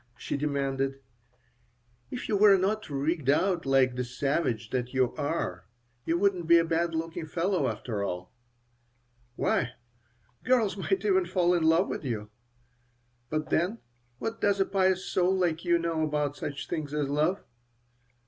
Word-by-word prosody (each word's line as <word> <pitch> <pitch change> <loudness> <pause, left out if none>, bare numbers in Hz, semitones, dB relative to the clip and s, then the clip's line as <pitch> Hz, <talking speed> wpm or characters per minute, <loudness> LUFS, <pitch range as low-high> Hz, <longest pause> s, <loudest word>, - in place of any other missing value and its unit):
she - - -4
demanded. 135 -2 -1 1.1
"If 250 - -5
you 210 - +1
were 200 -1 +7
not 205 +2 -1
rigged 145 0 -1
out 175 +1 +2
like 135 -2 +4
the 125 0 -2
savage 125 -3 -1
that 125 0 -2
you 130 -2 +2
are 140 - -3 0.4
you 165 - +2
wouldn't 185 -3 +1
be 170 0 +7
a 165 - +3
bad 165 0 0
looking 165 0 -4
fellow, 175 -2 0
after 110 -2 -3
all. 90 -2 -5 1.0
Why, 120 - 0 0.7
girls 230 -5 +2
might 195 0 -1
even 190 -3 +3
fall 180 -1 +2
in 175 - +2
love 165 +4 +4
with - - -4
you. 110 -5 -4 1.0
But 155 0 -3
then 180 +7 +1 0.4
what 225 - -4
does 200 -1 +2
a 195 - +4
pious 190 -1 +1
soul 185 +1 +2
like 170 -3 0
you 175 0 +4
know 165 -1 -1
about 150 -2 0
such 145 -1 -5
things 150 -2 -4
as 150 -2 0
love?" 155 +7 0
160 Hz, 155 wpm, -28 LUFS, 135-185 Hz, 1.1 s, were